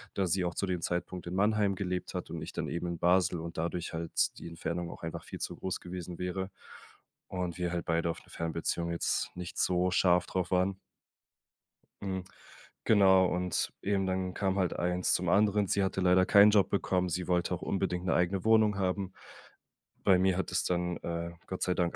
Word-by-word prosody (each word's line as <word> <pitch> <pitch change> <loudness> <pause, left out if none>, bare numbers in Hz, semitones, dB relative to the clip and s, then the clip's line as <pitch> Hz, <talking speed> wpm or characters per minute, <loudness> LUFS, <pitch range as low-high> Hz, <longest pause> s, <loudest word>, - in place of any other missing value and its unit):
da 95 -2 +1
sie 90 +1 +1
auch 85 - -2
zu 100 - -1
dem 90 -2 -2
Zeitpunkt 90 +1 -3
in 85 - -4
Mannheim 105 0 +2
gelebt 90 -1 -3
hat - - -4
und - - -5
ich - - -8
dann - - -3
eben 85 - -3
in 85 -1 -4
Basel 90 0 +3
und 85 +1 -7
dadurch 85 +1 -3
halt 80 0 -1
die - - -8
Entfernung 85 +1 -4
auch - - -11
einfach 80 - -5
viel - - -8
zu - - -4
groß 95 - -3
gewesen 90 -1 -7
wäre 95 +2 -3 0.8
und 90 -2 -3
wir 90 -1 -1
halt 85 -1 -3
beide 85 0 +1
auf 85 - -3
'ne - - -22
Fernbeziehung 85 +1 -2
jetzt 85 - 0
nicht 90 -1 -6
so 90 0 +2
scharf 90 0 +3
drauf 95 -1 -2
waren. 95 +1 +1 1.2
Mm, 95 -1 -2 0.6
genau, 95 -3 +6
und 90 0 -1
eben 100 -1 0
dann 95 -1 -1
kam 95 0 0
halt 95 -3 +1
eins 90 +1 +1
zum 90 -1 +1
anderen. 105 +1 +3
Sie 100 +2 +2
hatte 95 0 -1
leider 90 0 +5
keinen 100 +2 +7
Job 105 -2 +4
bekommen. 90 -2 0
Sie 90 +1 -2
wollte 90 0 +1
auch 90 - -10
unbedingt 90 -2 -1
'ne 95 - +2
eigene 90 +2 +1
Wohnung 110 -2 +4
haben. 95 0 -1 0.9
Bei 95 -2 +5
mir 95 -1 +2
hat 95 - -2
es 90 - +1
dann, 90 -1 0
äh, 85 0 -4 0.2
Gott 95 - -5
sei 90 - +1
Dank 85 -1 0
90 Hz, 200 wpm, -31 LUFS, 85-95 Hz, 1.2 s, keinen